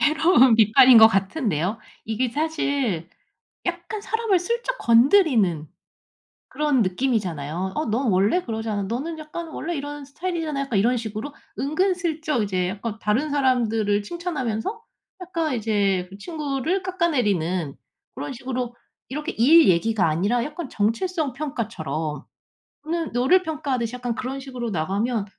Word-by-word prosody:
해로운 305 -5 +5
비판인 230 +3 +7
것 220 0 +10
같은데요. 195 - -1 0.3
이게 230 +3 -1
사실 280 - -1 0.6
약간 350 +4 -4
사람을 445 -3 +1
슬쩍 475 +6 -2
건드리는 230 - +4 0.8
그런 295 -5 +1
느낌이잖아요. 185 - -1
"어 305 - -1
넌 235 +4 0
원래 205 - +2
그러잖아. 220 -3 -3
너는 270 +11 -4
약간 320 +2 -7
원래 335 +2 -4
이런 290 0 -5
스타일이잖아." 315 -1 -3
약간 250 -7 -1
이런 245 +5 +3
식으로 225 +6 -6 0.2
은근 365 +7 +1
슬쩍 315 -7 -1
이제 185 -3 -1
약간 210 +3 -5
다른 255 +9 0
사람들을 225 -7 +1
칭찬하면서 305 - -3 0.4
약간 330 -6 -2
이제 200 -5 0
그 195 - -11
친구를 305 - -2
깎아내리는 205 - 0 0.4
그런 - - -5
식으로 250 -1 -4 0.3
이렇게 300 +6 -4
일 310 +6 +6
얘기가 185 +2 +2
아니라 200 +10 +1
약간 300 -1 -6
정체성 280 - -1
평가처럼 175 - -4 0.6
너는 330 0 -2
너를 265 +11 +3
평가하듯이 265 -7 -2
약간 245 -2 -3
그런 265 +2 -4
식으로 255 -3 -5
나가면 200 +6 -1
250 Hz, 325 characters per minute, -23 LUFS, 210-310 Hz, 0.8 s, 것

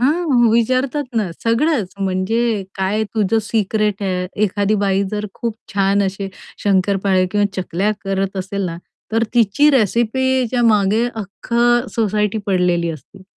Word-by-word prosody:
हां, 275 -3 +3
विचारतात 255 +5 +1
ना, 210 -5 0
सगळंच 230 - +1
म्हणजे 200 +3 0
काय 195 +3 0
तुझं 215 +1 +2
सिक्रेट 210 -1 0
आहे. 180 -2 -1 0.2
एखादी 205 +1 +1
बाई 195 -1 +1
जर 210 0 -3
खूप 230 -2 -4 0.2
छान 200 0 +2
अशी 195 0 -3 0.3
शंकरपाळी 190 -1 +2
किंवा 205 +1 +2
चकल्या 185 +3 -1
करत 195 0 -2
असेल 195 +1 -3
ना, 170 -1 -5 0.4
तर 225 - +2
तिची 235 +6 +4
रेसिपीच्या 250 +1 +1
मागे 215 +1 +3
अख्ख 210 +1 -9 0.4
सोसायटी 210 -1 0
पडलेली 180 -3 +1
असते 160 +6 -11
205 Hz, 130 wpm, -19 LUFS, 195-230 Hz, 0.4 s, तिची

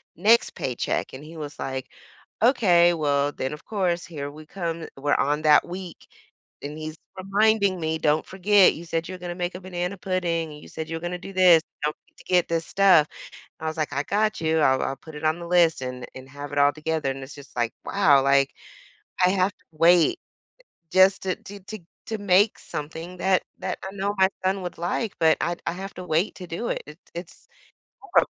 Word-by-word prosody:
next 220 +7 +4
paycheck.” 125 -2 -2
And 130 +2 -9
he 160 +2 -11
was 150 -1 -7
like, 130 -1 -4 0.6
“Okay.” 180 -9 +5
Well, 145 -3 +1
then, 130 +2 -3
of 150 - -10
course, 185 -5 -1
here 145 -5 -6
we 155 +1 -12
come. 165 -1 -4
We're 145 +1 +1
on 150 +2 +1
that 150 -1 +5
week. 180 0 -8 0.6
And 145 +2 -6
he's 155 0 -6 0.2
reminding 200 0 +2
me, 160 -1 -1
“Don't 150 +1 +2
forget. 195 +1 +4
You 170 - -9
said 165 0 -2
you're 185 +1 -6
gonna 175 0 -5
make 175 0 -3
a 180 - -7
banana 180 +1 -4
pudding 175 -4 -1
and 150 - -12
you - - -13
said 160 0 -6
you're 165 0 -3
gonna 175 +1 -3
do 195 +2 -9
this. 180 -3 +6 0.2
Don't 150 +1 0
forget - - -37
to - - -16
get 180 -2 +3
this 165 -1 -1
stuff.” 190 -6 +5 0.5
I 160 - -4
was 160 +1 -3
like, 150 -2 -1
“I 140 0 0
got 215 +5 0
you. 160 0 +1
I'll 130 -3 +3
I'll 135 - -2
put 160 +3 -13
it 150 - -7
on 155 +2 +2
the 170 - -6
list 170 -5 +3
and 125 -1 -5
and 130 0 -10
have 145 +1 -8
it 145 - -2
all 145 0 +5
together,” 155 -1 -2
and 135 0 -5
it's 135 - -11
just 140 -2 -14
like, 120 -1 0
"Wow," 155 -9 +4
like, 140 0 +3 0.7
"I - - +5
have 190 +1 +2
to - - -35
wait 170 - +4 0.7
just 190 +1 +5
to 185 -1 -1
to 200 0 -11
to 195 +3 -9 0.3
to 220 - -3
make 200 +1 +3
something 165 +4 -7
that 190 0 +2 0.2
that 185 - -4
I 190 - -5
know 200 +1 -1
my 190 0 +6 0.2
son 190 +1 +1
would 180 - -5
like, 180 +5 -2
but 160 -1 +5
I 175 0 -1
I - - 0
have 195 +3 -7
to 180 - -7
wait 170 +4 0
to 180 - -8
do 170 +9 -4
it. - - -2
It 150 +2 -12 0.2
it's 170 0 -9 0.7
horrib" - - +7
170 Hz, 215 wpm, -25 LUFS, 150-185 Hz, 0.7 s, horrib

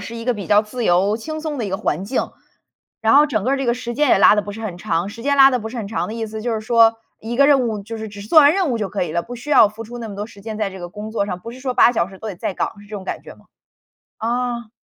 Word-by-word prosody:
是 230 +3 -7
一 230 - -7
个 250 -1 +1
比 200 -3 -6
较 205 0 +6
自 220 +3 -5
由 190 +4 +3
轻 310 +7 -6
松 305 -2 -4
的 235 - -3
一 - - -3
个 190 - -1
环 190 -4 -2
境。 255 - -2 0.7
然 225 +3 +4
后 295 +1 +7
整 215 -8 -2
个 270 +2 +1
这 270 - -2
个 235 - +2
时 245 -1 -5
间 295 +1 +2
也 - - +5
拉 195 - +7
得 210 - +2
不 205 0 -7
是 225 +2 -8
很 190 -5 -5
长。 180 0 -1
时 230 +2 -10
间 280 +1 +1
拉 275 0 +8
得 250 - 0
不 220 -1 -6
是 240 - -8
很 220 - -4
长 215 +1 -3
的 215 - -5
意 230 -1 -3
思 220 0 -7
就 235 0 -2
是 215 - -2
说， 225 0 +4 0.3
一 230 +2 -5
个 280 +2 +5
任 270 -4 +4
务 210 -2 -4
就 225 +2 -7
是 220 - -6
只 205 -1 -10
是 210 - -11
做 320 - +6
完 290 -1 +8
任 375 -8 +1
务 235 - -1
就 205 -3 -2
可 195 +2 -2
以 170 -3 -3
了， 170 +1 0
不 245 +1 -8
需 245 +5 -8
要 220 - +7
付 220 +2 -9
出 240 +2 -9
那 230 - -6
么 205 - -7
多 205 - -3
时 205 -3 -15
间 215 +1 -6
在 210 -2 -2
这 190 - -10
个 175 - -6
工 210 +3 -8
作 205 -3 -1
上， 180 -2 -4
不 230 - -8
是 255 - -12
说 255 -1 -3
8 - - +6
个 - - +1
小 170 -6 0
时 190 -1 -13
都 220 - -6
得 195 - -6
在 185 - -3
岗， - - -2
是 205 - -15
这 210 +1 -7
种 190 - -8
感 - - -5
觉 - - -12
吗？ - - -23 0.7
啊。 235 0 -2
220 Hz, 370 characters per minute, -20 LUFS, 205-245 Hz, 0.7 s, 拉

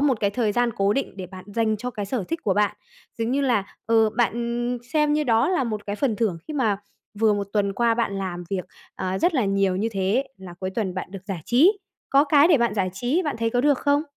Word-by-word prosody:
một 275 -6 +2
cái 200 -1 +2
thời 215 -1 0
gian 240 +1 +2
cố 200 +1 +2
định 275 -4 -3
để 185 -2 -6
bạn 185 0 -11
dành 220 -2 +1
cho 250 +4 -4
cái 205 -3 -5
sở 225 -4 -2
thích 330 - -2
của 195 -3 +1
bạn, 210 0 +1 0.4
giống 230 +1 -1
như 280 +2 +1
là, 240 -8 +2 0.2
ừ, 225 -1 +4
bạn 240 +1 0
xem 300 -1 +3
như 300 0 +1
đó 230 +4 +3
là 355 -8 +1
một 215 -3 -4
cái 205 +1 -3
phần 235 -5 0
thưởng, 195 -7 0
khi 305 - -4
mà 220 -8 +1 0.4
vừa 220 -1 +4
1 200 -1 -3
tuần 200 -2 +1
qua 235 +2 +2
bạn 225 -4 -1
làm 175 -2 -4
việc, 190 -2 -2 0.3
ờ, 185 +1 -2
rất 350 - +2
là 255 - +2
nhiều 195 -1 +1
như 220 +4 0
thế 195 +7 +1
là 185 -2 -10
cuối 185 +1 -4
tuần 190 -2 -2
bạn 185 0 -5
được 195 -1 -9
giải 190 -5 -4
trí, 340 - +4 0.3
có 275 +2 +5
cái 290 +2 +5
để 305 -7 +5
bạn 235 -3 +1
giải 185 -3 0
trí, 250 - 0
bạn 295 - -2
thấy 230 0 0
có 245 +1 +1
được 285 -1 +3
không? 285 +1 +2
225 Hz, 260 wpm, -24 LUFS, 195-255 Hz, 0.4 s, có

